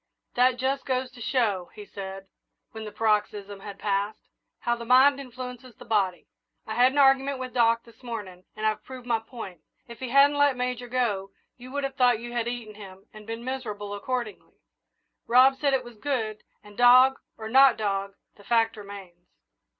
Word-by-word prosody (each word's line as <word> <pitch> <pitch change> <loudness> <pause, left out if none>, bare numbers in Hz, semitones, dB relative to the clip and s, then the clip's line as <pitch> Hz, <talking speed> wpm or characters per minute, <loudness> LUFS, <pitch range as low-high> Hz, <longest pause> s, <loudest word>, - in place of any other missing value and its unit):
"That 250 0 +3
just 265 +2 -1
goes 255 -1 -2
to 245 -1 -14
show," 215 -8 0
he 210 -1 -9
said, 195 -1 -8 0.5
when 220 -1 -8
the 210 - -7
paroxysm 205 -2 -1
had 200 0 -9
passed, 200 +1 -2 0.3
"how 240 - +1
the 235 - -8
mind 260 +4 +5
influences 250 -2 -9
the - - -13
body. 195 -6 0 0.4
I 220 - -5
had 250 +3 +4
an 285 - -5
argument 270 0 +4
with 255 -1 -6
Doc 230 -1 +3
this 230 0 -20
morning, 205 -7 -7
and 215 - -4
I've 215 -1 0
proved 255 -2 -10
my 235 -2 +1
point. 220 - -10 0.3
If 235 -1 -11
he 260 -2 -5
hadn't 280 +2 +5
let 285 -3 +4
Major 250 0 -3
go, 230 -6 -1 0.3
you 255 +1 -12
would 285 0 -2
have 275 0 -4
thought 245 -3 +4
you 240 +1 -8
had 235 -1 -1
eaten 240 -3 -5
him 195 -2 -12
and 215 0 -13
been 230 +1 -6
miserable 210 -6 -5
accordingly. 235 +1 -5 0.7
Rob 255 +3 +6
said 280 0 +1
it 255 - -1
was 240 -3 -13
good, 220 -6 -2 0.2
and, 210 0 -15
dog 255 +3 +6 0.2
or 220 - -6
not 265 +2 +6
dog, 200 -2 -2 0.2
the 205 - -16
fact 225 0 +1
remains." 195 -4 -11
235 Hz, 190 wpm, -26 LUFS, 210-255 Hz, 0.7 s, Rob